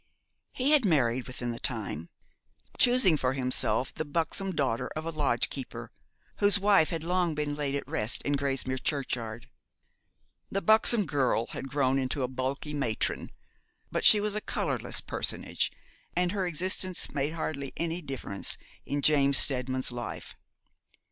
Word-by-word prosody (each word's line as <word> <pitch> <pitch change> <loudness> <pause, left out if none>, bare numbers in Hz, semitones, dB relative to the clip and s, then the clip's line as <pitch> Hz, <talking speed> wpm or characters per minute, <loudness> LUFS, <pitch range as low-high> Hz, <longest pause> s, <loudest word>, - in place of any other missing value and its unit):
He 270 +3 0
had 300 -4 +5
married 130 - +1
within 125 -1 -4
the 115 - -6
time, 100 - -4 0.7
choosing 245 -10 +5
for 130 -2 0
himself 125 -2 +1
the - - -3
buxom 165 +6 -1
daughter 130 -8 -1
of 155 +1 -4
a 165 - -3
lodgekeeper, 140 -3 -2 0.5
whose 205 0 +5
wife 200 -5 +4
had 165 -3 -3
long 175 -1 0
been 150 -1 -2
laid 145 -2 -2
at 140 - -4
rest 105 +2 0
in 145 - 0
Grasmere 135 -2 -1
churchyard. 120 -6 -3 1.0
The 195 - -2
buxom 220 0 +5
girl 130 -6 +1
had 135 - -6
grown 135 -1 +1
into 130 +1 -2
a - - 0
bulky 130 +3 -4
matron, 120 -7 -2 0.6
but - - -1
she 210 - +8
was 210 0 -1
a 215 - -2
colourless - - -2
personage, - - -1 0.4
and 175 0 +1
her 195 -2 -1
existence 185 +2 +1
made 145 +2 -1
hardly 140 -4 -4
any 170 +1 -2
difference 135 - -2 0.3
in 145 0 -2
James 140 -2 +4
Steadman's 130 -1 +3
life. 120 0 -6
145 Hz, 150 wpm, -29 LUFS, 130-175 Hz, 1.0 s, she